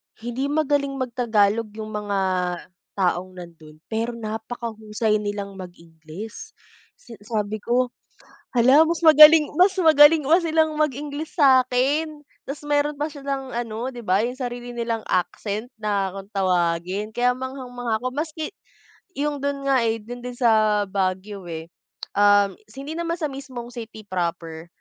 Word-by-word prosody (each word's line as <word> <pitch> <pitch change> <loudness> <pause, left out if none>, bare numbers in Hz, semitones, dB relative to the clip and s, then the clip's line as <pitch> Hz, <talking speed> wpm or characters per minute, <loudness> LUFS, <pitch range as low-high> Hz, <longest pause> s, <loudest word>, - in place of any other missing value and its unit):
Hindi 240 +4 -3
magaling 285 -2 0
mag 260 -2 -3
tagalog 225 -2 +2
yung 215 0 -6
mga 205 -1 -2 0.8
taong 185 -1 -1
nandun 165 -4 -12 0.2
pero 230 +2 -2
napakahusay 220 -1 -3
nilang 200 -1 -5
mag 180 -1 -8
Ingles. 165 +6 -11 0.4
Si - - -18
Sabi 210 0 -3
ko 245 +3 0 0.6
"Hala 260 +4 +6
mas 330 +1 +1
magaling 305 0 +8
mas 375 +4 +4
magaling 310 -3 +6
pa 335 +5 +4
silang 315 -1 +1
mag 300 0 +2
Ingles 290 +3 -6
sakin" 275 +3 +3 0.2
Tas 290 +2 -8
meron 290 0 +1
pa 295 - 0
silang 275 -3 -5
ano 235 +2 -4
di 240 - -8
ba 200 +2 +2
yung 250 - -4
sarili 245 -2 -6
nilang 230 -1 -3
accent 205 +6 -2
na 200 -3 -1
kung 195 +1 -9
tawagin 185 +2 0
kaya 245 +1 +3
manghang-mangha 245 -3 -4
ako 255 - -1
maski 305 +3 -4 0.6
yung 290 +1 -2
dun 280 0 -2
nga 265 -3 +3
eh 225 -1 -1
dun 245 +3 -9
din 250 - -6
sa 215 -3 +3
Baguio 190 0 -2
eh. 160 0 -7 0.5
Um, 205 -1 +5 0.2
hindi 275 +3 -6
naman 335 0 -1
sa 305 -3 -1
mismong 260 -3 -8
city 225 -2 -9
proper. 170 -3 -3
240 Hz, 145 wpm, -23 LUFS, 205-280 Hz, 0.8 s, magaling